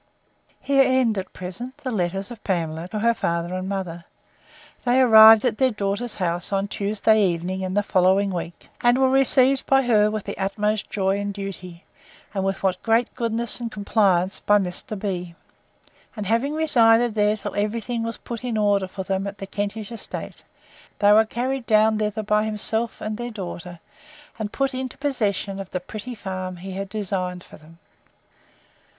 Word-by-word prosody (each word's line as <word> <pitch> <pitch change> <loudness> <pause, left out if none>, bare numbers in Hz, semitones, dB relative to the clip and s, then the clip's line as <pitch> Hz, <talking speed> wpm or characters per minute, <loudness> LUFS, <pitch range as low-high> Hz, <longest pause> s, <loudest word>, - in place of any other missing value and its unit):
Here 275 -1 +3
end, 255 -5 +2
at 190 - -7
present, 190 +9 -7
the 280 -3 -5
letters 195 +1 -2
of 230 - -10
Pamela 165 -3 -2
to 215 - -5
her 230 +2 +3
father 170 -5 -2
and 185 +1 -4
mother. 175 -4 -4 0.8
They 250 +1 +3
arrived 220 -2 +8
at 235 -3 0
their 260 -1 +4
daughter's 210 +1 -3
house 175 -1 -2
on 195 0 0
Tuesday 210 +1 +2
evening 180 +1 -1
in 185 0 -3
the 205 - +2
following 190 +1 +2
week, 170 -1 -6
and 240 +1 +4
were 265 0 +3
received 270 0 +4
by 270 0 +4
her 215 -4 +3
with 215 -1 -3
the - - -6
utmost 210 +2 -1
joy 195 0 0
and 205 0 -3
duty; 190 -3 -8 0.5
and 195 -2 -1
with 195 0 -2 0.2
great 230 +1 +1
goodness 230 0 -1
and 235 -1 -4
complaisance 200 -3 +1
by 205 - +3
Mr. 190 +2 -3
B——. 180 -4 -4 0.8
And 210 -2 -5
having 230 +8 0
resided 240 -7 +4
there 210 0 +2
till 205 -1 -6
every 210 +3 -1
thing 235 +1 -4
was 230 0 -4
put 235 0 -7
in 240 -3 -2
order 205 -2 +2
for 190 +1 -6
them 195 +1 -2
at 200 +1 -7
the 195 - -6
Kentish 205 +2 -4
estate, 230 - -7 0.6
they 205 0 +4
were 220 +1 +6
carried 250 +3 -3
down 215 0 +4
thither 215 0 -2
by 210 +1 +1
himself, 220 +2 -1
and 215 0 -4
their 240 0 -4
daughter, 180 -5 -7 0.6
and 210 -1 -3
put 275 0 -1
into 255 -1 -5
possession 210 -8 0
of 195 -1 -7
the 180 - -3
pretty 215 +7 -8
farm 185 -3 -5
he 190 +2 -8
had 195 +1 -5
designed 185 -3 -3
for - - -14
them. 160 +2 -18
210 Hz, 180 wpm, -23 LUFS, 190-230 Hz, 0.8 s, arrived